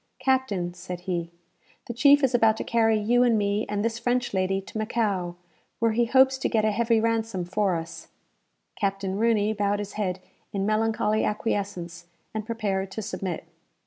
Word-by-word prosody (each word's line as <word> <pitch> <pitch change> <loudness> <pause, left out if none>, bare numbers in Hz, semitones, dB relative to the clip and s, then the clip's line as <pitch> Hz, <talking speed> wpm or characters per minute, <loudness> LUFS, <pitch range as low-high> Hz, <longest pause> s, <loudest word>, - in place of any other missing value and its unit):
"Captain," 215 -10 0
said 180 0 -7
he, 175 -2 -3 0.6
"the 240 - -5
chief 285 +4 +5
is 260 -1 +3
about 225 -2 +4
to - - -3
carry 225 -1 +2
you 235 +4 +2
and 240 -2 +4
me, 205 +1 0
and 205 +1 -1
this 230 0 -1
French 245 0 0
lady, 190 0 +1
to 195 +3 -7
Macao, 205 -6 -1 0.4
where 230 -1 +2
he 235 +2 +2
hopes 265 +2 +4
to - - 0
get 220 -2 +2
a 215 - +3
heavy 230 +1 +2
ransom 225 -4 -1
for 190 0 0
us." 165 0 -7 0.7
Captain 195 -1 -2
Rooney 220 -2 +2
bowed 205 -1 0
his 205 -1 -6
head 190 -3 -2 0.3
in 195 -1 -1
melancholy 215 0 +1
acquiescence, 195 -5 -3 0.3
and 215 -1 -4
prepared 200 -4 -2
to 220 +3 -5
submit. 190 -4 -4
215 Hz, 175 wpm, -26 LUFS, 195-230 Hz, 0.7 s, chief